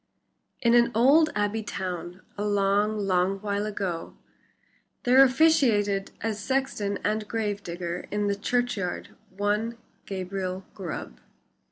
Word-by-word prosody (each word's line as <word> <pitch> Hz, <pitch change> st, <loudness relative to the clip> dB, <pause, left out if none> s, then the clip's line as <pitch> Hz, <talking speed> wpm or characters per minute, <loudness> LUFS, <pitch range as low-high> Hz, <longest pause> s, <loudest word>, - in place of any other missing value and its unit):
In 235 Hz, -1 st, +4 dB
an 240 Hz, 0 st, +5 dB
old 285 Hz, +7 st, +5 dB
abbey 205 Hz, +1 st, 0 dB
town, 180 Hz, -3 st, -5 dB
a 205 Hz, -, -3 dB
long, 205 Hz, +1 st, +2 dB
long 195 Hz, -1 st, +1 dB
while 205 Hz, 0 st, -1 dB
ago 190 Hz, -5 st, -4 dB, 0.9 s
there 255 Hz, +2 st, +7 dB
officiated 255 Hz, -9 st, +3 dB
as 220 Hz, -1 st, -2 dB
sexton 260 Hz, -7 st, -1 dB
and 215 Hz, 0 st, -1 dB
gravedigger 185 Hz, -6 st, -3 dB
in 210 Hz, 0 st, -1 dB
the 200 Hz, -, +1 dB
churchyard 210 Hz, -4 st, -1 dB, 0.2 s
one 210 Hz, +4 st, -1 dB, 0.3 s
Gabriel 185 Hz, -1 st, -4 dB
Grubb. 165 Hz, -, -6 dB
205 Hz, 115 wpm, -26 LUFS, 195-230 Hz, 0.9 s, there